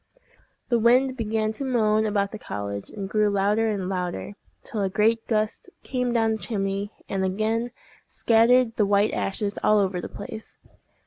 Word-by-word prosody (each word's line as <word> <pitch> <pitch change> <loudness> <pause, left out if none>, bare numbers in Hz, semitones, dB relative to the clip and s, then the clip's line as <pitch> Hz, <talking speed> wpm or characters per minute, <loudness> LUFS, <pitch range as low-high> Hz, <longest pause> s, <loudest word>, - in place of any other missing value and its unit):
The 240 -2 +3
wind 255 +3 +4
began 220 -2 -1
to 220 +6 -6
moan 220 -4 +2
about 200 -1 0
the 215 - -7
cottage, 100 - -5
and 200 -2 -6
grew 210 +1 +2
louder 205 +3 +1
and 200 -4 -2
louder, 180 +1 -3 0.3
till 215 - -4
a 195 - +1
great 225 +3 +1
gust 215 +9 -1
came 250 -2 -1
down 225 -2 +2
the 220 - 0
chimney, 200 -2 -2 0.2
and 195 -1 -2
again 220 +5 0 0.4
scattered 230 +1 +3
the 210 - +3
white 205 +1 +3
ashes 200 +1 -2
all 215 - +5
over 190 -3 0
the - - -6
place. 215 +2 -9
215 Hz, 170 wpm, -25 LUFS, 200-225 Hz, 0.4 s, all